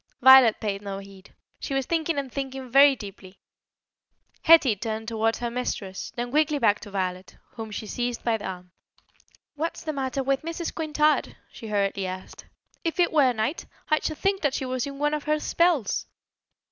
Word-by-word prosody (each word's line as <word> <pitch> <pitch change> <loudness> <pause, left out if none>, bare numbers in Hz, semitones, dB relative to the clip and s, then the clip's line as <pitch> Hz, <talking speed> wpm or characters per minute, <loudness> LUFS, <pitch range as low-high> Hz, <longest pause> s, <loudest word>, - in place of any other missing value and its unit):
Violet 260 -3 +8
paid 200 -2 -3
no 200 -1 -5
heed; 195 -1 -13 0.3
she 275 - -4
was 270 -1 0
thinking 330 0 -1
and 275 -2 -3
thinking 270 -1 -5
very 275 +1 +7
deeply. 200 -4 -11 1.0
Hetty 315 -9 +6
turned 220 +1 -4
towards 225 0 0
her 240 -1 -3
mistress, 205 -6 -4
then 240 0 -4
quickly 300 +1 +2
back 210 -6 +3
to - - -10
Violet, 185 -1 -4
whom 225 -2 -7
she 215 +1 -6
seized 240 +2 -3
by 230 -2 +1
the 205 - -6
arm. 180 -1 -8 0.8
"What's 320 +2 -4
the 310 - -3
matter 270 -1 -2
with 270 0 0
Mrs. 330 +1 -4
Quintard?" 305 -1 +1 0.2
she 225 - -10
hurriedly 200 -2 -1
asked. 185 0 -8 0.4
"If 330 +1 -2
it 350 - +3
were 280 -5 +5
night, 240 +7 -2 0.2
I 310 - +4
should 310 - -3
think 390 0 0
that 285 -4 +1
she 265 - -2
was 255 0 -2
in 275 0 -7
one 295 +1 0
of 300 -1 -3
her 305 0 +1
spells." 330 - +1
255 Hz, 185 wpm, -25 LUFS, 210-295 Hz, 1.0 s, Violet